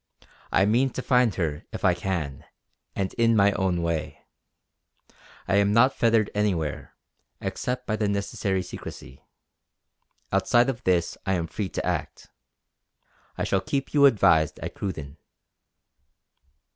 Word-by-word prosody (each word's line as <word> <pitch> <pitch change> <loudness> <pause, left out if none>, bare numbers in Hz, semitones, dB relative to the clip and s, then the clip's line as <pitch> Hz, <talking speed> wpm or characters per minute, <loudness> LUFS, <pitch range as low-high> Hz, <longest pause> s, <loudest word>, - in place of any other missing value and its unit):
I 95 - +4
mean 120 +6 +3
to - - -3
find 125 -5 +3
her 80 -5 -2
if - - -4
I 90 - +5
can, 85 -6 -3 0.5
and 95 -1 -2
in 115 -1 +4
my 100 -1 +5
own 95 -4 0
way. 80 -2 -3 1.3
I 95 - +2
am 100 0 +3
not 130 +4 +5
fettered 115 -3 +2
anywhere, 90 -8 -2 0.4
except 125 0 -3
by 110 - -1
the 105 - 0
necessary 100 -1 -1
secrecy. 70 -6 -10 1.1
Outside 120 +2 +3
of 125 -1 -11
this 90 -2 +1
I 95 - +2
am 85 -3 0
free 95 +3 -4
to - - -4
act. - - -3 1.1
I - - -1
shall 95 - +1
keep 135 +7 -3
you 140 -1 +7
advised 80 - +3
at - - -5
Cruden." 75 -7 -6
100 Hz, 135 wpm, -25 LUFS, 85-115 Hz, 1.3 s, you